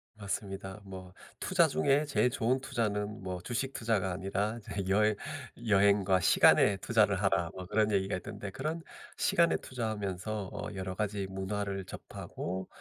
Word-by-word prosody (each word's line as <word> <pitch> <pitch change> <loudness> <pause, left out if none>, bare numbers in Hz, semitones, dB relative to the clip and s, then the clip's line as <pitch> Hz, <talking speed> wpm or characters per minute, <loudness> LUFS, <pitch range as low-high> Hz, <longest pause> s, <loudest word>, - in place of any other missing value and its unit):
맞습니다. 100 -1 -5
뭐 95 -2 -9 0.3
투자 175 -3 +4
중에 140 0 +2
제일 140 -3 +2
좋은 125 +1 +1
투자는 105 -5 -2
뭐 90 -1 -4
주식 125 +7 -2
투자가 105 -5 0
아니라 100 +4 -1
이제 100 -3 -5
여해 105 +2 +4 0.5
"여행과 100 -2 +4
시간에 100 +3 +6
투자를 105 -1 +3
하라." 85 -4 +1
뭐 95 -1 -6
그런 105 +2 +2
얘기가 95 -1 +1
있던데 100 +1 -7
그런 155 - -3 0.4
시간에 170 -1 +3
투자하면서 105 -4 -3
어 - - -5
여러 95 -1 -4
가지 105 -1 -1
문화를 95 0 -3
접하고 95 0 -6
100 Hz, 330 characters per minute, -31 LUFS, 95-110 Hz, 0.5 s, 시간에